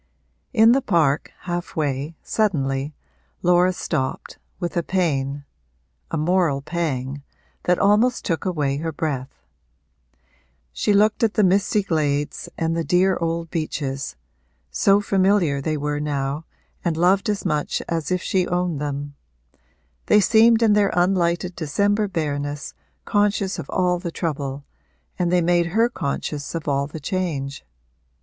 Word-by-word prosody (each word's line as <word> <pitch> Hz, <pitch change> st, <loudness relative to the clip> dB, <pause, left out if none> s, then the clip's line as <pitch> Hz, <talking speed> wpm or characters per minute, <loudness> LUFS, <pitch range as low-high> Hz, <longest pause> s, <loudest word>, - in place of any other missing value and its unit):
In 225 Hz, -2 st, +6 dB
the 270 Hz, +3 st, +4 dB
park, 160 Hz, -, +1 dB
half 175 Hz, -1 st, -4 dB
way, 145 Hz, +1 st, -2 dB
suddenly, 145 Hz, -8 st, 0 dB, 0.5 s
Laura 180 Hz, +1 st, +4 dB
stopped, 155 Hz, -6 st, -3 dB, 0.2 s
with 175 Hz, -3 st, -3 dB
a 170 Hz, -, +2 dB
pain 145 Hz, -6 st, -1 dB, 0.6 s
a -, -, -2 dB
moral 155 Hz, -3 st, +1 dB
pang 140 Hz, -5 st, -3 dB, 0.4 s
that 180 Hz, 0 st, +3 dB
almost 215 Hz, +5 st, +3 dB
took 165 Hz, -3 st, -1 dB
away 150 Hz, -7 st, 0 dB
her 160 Hz, +2 st, -3 dB
breath; 140 Hz, -4 st, -4 dB, 1.3 s
she -, -, 0 dB
looked 210 Hz, +1 st, +3 dB
at 225 Hz, -2 st, +2 dB
the 215 Hz, -, +4 dB
misty 200 Hz, +2 st, +2 dB
glades 150 Hz, -5 st, -1 dB
and 165 Hz, 0 st, 0 dB
the 165 Hz, -, 0 dB
dear 185 Hz, +3 st, +3 dB
old 165 Hz, 0 st, -2 dB
beeches 140 Hz, -4 st, -3 dB, 0.6 s
(so 200 Hz, +1 st, +4 dB
familiar 190 Hz, -7 st, +2 dB
they 155 Hz, +2 st, -1 dB
were 145 Hz, 0 st, -2 dB
now 145 Hz, +1 st, -2 dB, 0.4 s
and 170 Hz, -3 st, 0 dB
loved 190 Hz, +6 st, +3 dB
as 205 Hz, -1 st, -2 dB
much 150 Hz, -1 st, 0 dB
as 165 Hz, -2 st, -2 dB
if 180 Hz, -1 st, 0 dB
she 185 Hz, -2 st, +1 dB
owned 175 Hz, -4 st, -1 dB
them); 145 Hz, 0 st, -4 dB, 0.9 s
they 210 Hz, -, +6 dB
seemed 225 Hz, +2 st, +5 dB
in 215 Hz, -2 st, +5 dB
their 205 Hz, -1 st, +3 dB
unlighted 175 Hz, 0 st, +1 dB
December 205 Hz, +7 st, +1 dB
bareness 145 Hz, -5 st, -3 dB, 0.3 s
conscious 205 Hz, -1 st, +1 dB
of -, -, -7 dB
all 180 Hz, -1 st, +1 dB
the 170 Hz, -1 st, -5 dB
trouble, 140 Hz, -5 st, -3 dB, 0.5 s
and 175 Hz, -1 st, +1 dB
they 180 Hz, -1 st, +4 dB
made 170 Hz, 0 st, +2 dB
her 225 Hz, +7 st, +2 dB
conscious 145 Hz, -5 st, -4 dB
of 165 Hz, -2 st, -4 dB
all 140 Hz, -1 st, +1 dB
the 155 Hz, +2 st, -8 dB
change. 145 Hz, -5 st, -3 dB
170 Hz, 140 wpm, -22 LUFS, 145-190 Hz, 1.3 s, In